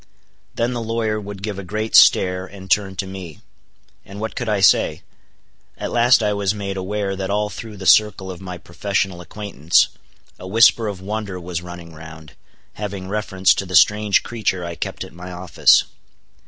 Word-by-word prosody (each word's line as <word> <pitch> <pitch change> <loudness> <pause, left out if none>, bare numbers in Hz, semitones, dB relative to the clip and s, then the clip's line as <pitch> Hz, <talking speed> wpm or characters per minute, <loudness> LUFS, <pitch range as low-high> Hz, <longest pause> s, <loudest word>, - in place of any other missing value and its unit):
Then 120 +2 0
the 120 - -3
lawyer 110 -1 -2
would 100 -1 -9
give 100 -2 -4
a - - -6
great 110 +4 -3
stare, 90 0 +5
and 95 0 -12
turn 95 -2 +2
to 95 +1 -3
me. 95 -5 -9 0.6
And 100 +1 -11
what 110 +1 -4
could 120 -3 -3
I 105 -2 +1
say? 90 -3 +3 0.7
At - - -5
last 120 0 +4
I 105 0 +1
was 100 0 -1
made 100 -2 -4
aware 95 +1 -3
that 95 0 -4
all 105 +1 -1
through 110 -2 -9
the 95 - -8
circle 95 0 +4
of 90 0 -10
my 90 -1 -7
professional 95 +1 -3
acquaintance, 90 -4 +1 0.5
a 90 - -8
whisper 115 +2 +4
of 100 -3 -5
wonder 100 -1 -4
was 85 -1 -5
running 85 -1 -10
round, 80 0 -12 0.4
having 100 -2 -6
reference 95 -2 +2
to 95 - -4
the 90 - -3
strange 105 +3 +4
creature 100 -6 -2
I 85 - -5
kept - - -5
at - - -12
my 90 +1 -9
office. 90 -4 +4
95 Hz, 180 wpm, -20 LUFS, 90-105 Hz, 0.7 s, stare